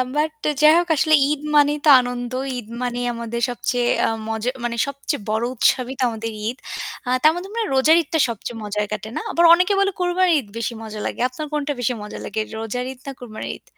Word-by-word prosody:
but 305 +1 +1 0.3
যাই 305 +1 +8
হোক, 350 0 +1
আসলে 310 +2 +2 0.2
ঈদ 295 -1 -1
মানেই 295 0 +5
তো - - +6
আনন্দ। 245 0 -4 0.3
ঈদ 225 -3 -7
মানেই 245 0 -2
আমাদের 235 0 -4
সবচেয়ে 245 0 -1 0.2
আ - - +2 0.2
মজা 225 +2 -1
মানে 235 -1 -2
সবচেয়ে 280 -1 -3
বড় 220 +2 0
উৎসবই 255 +1 +1
তো - - +1
আমাদের 225 0 -5 0.2
ঈদ। 245 - -3 0.5
আ - - -1
তার 310 - +7
মধ্যে 360 +2 -5
মনে 460 -1 -1
রোজার 305 +5 +5
ঈদটা 320 +2 -2
সবচেয়ে 230 +1 -5
মজায় 210 0 -2
কাটে, 215 0 -4
না? - - -2
আবার 340 - +2
অনেকে 360 +4 +3
বলে 395 0 +2
কোরবানির 360 -1 +2
ঈদ 225 - -9
বেশি 230 +1 -2
মজা 215 -1 -7
লাগে। - - -4
আপনার 255 +5 -6
কোনটা 295 -1 -1
বেশি 245 +1 0
মজা 210 - -8
লাগে, 220 +2 -4 0.2
রোজার 235 +3 -3
ঈদ 255 - -21
না 275 - -3
কোরবানির 225 -3 -6
ঈদ? - - -33
250 Hz, 215 wpm, -21 LUFS, 230-300 Hz, 0.5 s, যাই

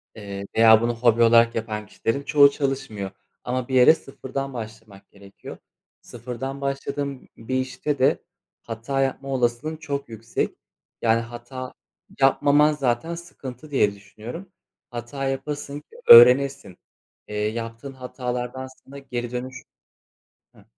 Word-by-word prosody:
Eee, 100 -2 -7
veya 110 0 +7
bunu 120 0 0
hobi 115 0 +3
olarak 115 0 +5
yapan 110 -1 -3
kişilerin 115 +6 -3
çoğu 140 -1 +6
çalışmıyor 135 -9 -3 0.3
ama 125 0 -2
bir 130 - -2
yere 125 +4 +8
sıfırdan 135 -1 -6
başlamak 110 -3 -9
gerekiyor. 100 -1 -12 0.4
Sıfırdan 125 +3 -7
başladığın 140 0 -4
bir 115 +3 -4
işte 130 +2 -2
de 130 +2 +3 0.4
hata 115 +4 -3
yapma 135 +1 -2
olasılığın 130 +4 -1
çok 140 -4 -5
yüksek. 115 0 -3 0.4
Yani 115 0 +3
hata 120 +2 -8 0.5
yapmaman 145 +2 +4
zaten 140 +3 -1
sıkıntı, 155 -4 -10
diye 105 -7 +2
düşünüyorum. 110 - -10 0.4
Hata 120 +4 -5
yapasın 140 +1 -4
ki 150 - -22
öğrenesin. 125 -4 +7 0.5
Eee, 105 - -7
yaptığın 115 +4 -6
hatalardan 125 0 -5 0.2
sana 140 +1 -12
geri 120 -3 -5
dönüş 130 +1 -6 0.9
Hıh. - - -19
125 Hz, 125 wpm, -24 LUFS, 115-140 Hz, 0.9 s, yere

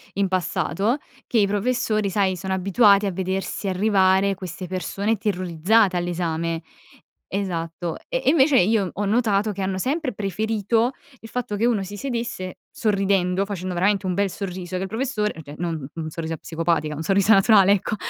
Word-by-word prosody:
in 200 0 +1
passato, 185 - 0 0.3
che 240 - -1
i 200 - +4
professori, 215 0 0
sai, 190 -1 +1
sono 190 +2 -3
abituati 200 +2 +4
a 195 - 0
vedersi 190 +2 -2
arrivare 190 0 +3
queste 185 0 -7
persone 195 +4 -1
terrorizzate 190 0 +2
all'esame. 170 -2 -2 0.7
Esatto, 170 -3 -3
e - - -1
e - - +5
invece 280 -3 +5
io 200 0 +2
ho 205 +1 -2
notato 210 -1 +1
che 195 - -5
hanno 190 0 -1
sempre 270 - -1
preferito 220 +4 0 0.3
il 225 - -12
fatto 240 -4 -3
che 225 - +1
uno 225 -5 +2
si 205 +2 -7
sedesse 235 -8 -4
sorridendo, 195 -3 +1
facendo 185 -2 -4
veramente 195 +2 +1
un 185 - 0
bel 200 +1 +1
sorriso, 185 -1 -5
che - - -3
il - - -3
professore, 220 -2 -1
cioè 145 +1 -10
non 170 -2 -2 0.2
u 165 - -5
un 155 - -4
sorriso 165 +1 -4
psicopatica, 165 -1 -1
un 155 - -5
sorriso 200 +4 +4
naturale, 195 0 +6
ecco; 205 +1 -1
195 Hz, 170 wpm, -23 LUFS, 180-215 Hz, 0.7 s, naturale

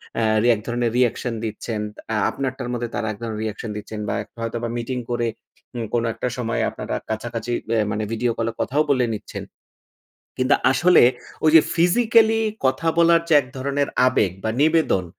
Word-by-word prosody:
অ্যা 110 +1 +3
এক - - -7
ধরনের 120 -1 0
রিঅ্যাকশন 125 -1 +1
দিচ্ছেন। 110 0 -4 0.3
অ্যা 110 - 0
আপনারটার 130 -2 -4
মধ্যে 120 -1 -3
তারা 115 -2 -2
এক 105 - -8
ধরণের 110 -2 -4
রিঅ্যাকশন 110 +1 -4
দিচ্ছেন 105 +1 -7
বা - - -1
এক - - -22
হয়তোবা 115 +1 -3
মিটিং 120 +2 -3
করে 120 -1 0 0.5
ঊম 115 -1 -3
কোনো 120 -1 +1
একটা 115 - -3
সময় 115 -1 -1
আপনারা - - -5
কাছাকাছি 115 +1 -4 0.2
ভ্যা 115 -1 +2
মানে 105 +1 -2
ভিডিও 115 +1 0
কল 115 - -1
এ - - -19
কথাও 145 +4 +1
বলে 130 -3 +3
নিচ্ছেন। 105 -1 -7 0.9
কিন্তু 130 +2 +3 0.2
আসলে, 175 +5 +5 0.4
ওই 155 - +6
যে 160 - +10
ফিজিক্যাল 220 +6 +4 0.4
কথা 135 +5 +1
বলার 170 0 +5
যে - - +4
এক 125 - -13
ধরনের 140 +2 -1 0.2
আবেগ 105 -7 +2
বা 110 - 0
নিবেদন, 155 - +3
120 Hz, 180 wpm, -22 LUFS, 110-140 Hz, 0.9 s, যে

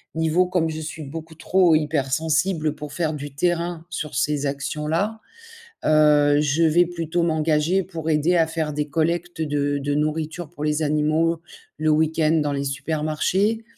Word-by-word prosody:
niveau 160 +3 +2
comme 180 -3 0
je 160 0 -5
suis 155 0 -6
beaucoup 160 +3 -8
trop 175 0 +3
hyper 150 -3 0
sensible 155 0 0
pour 150 -1 -8
faire 160 -3 -1
du 145 -1 -7
terrain 170 +1 -1
sur 160 -3 -5
ces 145 -1 0
actions-là. 150 +9 -2 0.7
Heu, 150 -1 +5
je 150 +2 +1
vais 165 +2 +4
plutôt 170 0 -2
m'engager 160 +2 +1
pour 165 -3 -5
aider 155 +3 +2
à 165 - +4
faire 160 -2 -2
des 150 0 -2
collectes 170 +3 -1
de 145 -1 0
de 145 +1 -2
nourriture 155 +2 -2
pour 150 - -6
les 150 +1 0
animaux, 155 +2 +1 0.4
le 155 0 +1
week-end 155 0 +2
dans 145 -1 -1
les 140 0 -2
supermarchés. 155 - -1
155 Hz, 160 wpm, -23 LUFS, 150-165 Hz, 0.7 s, Heu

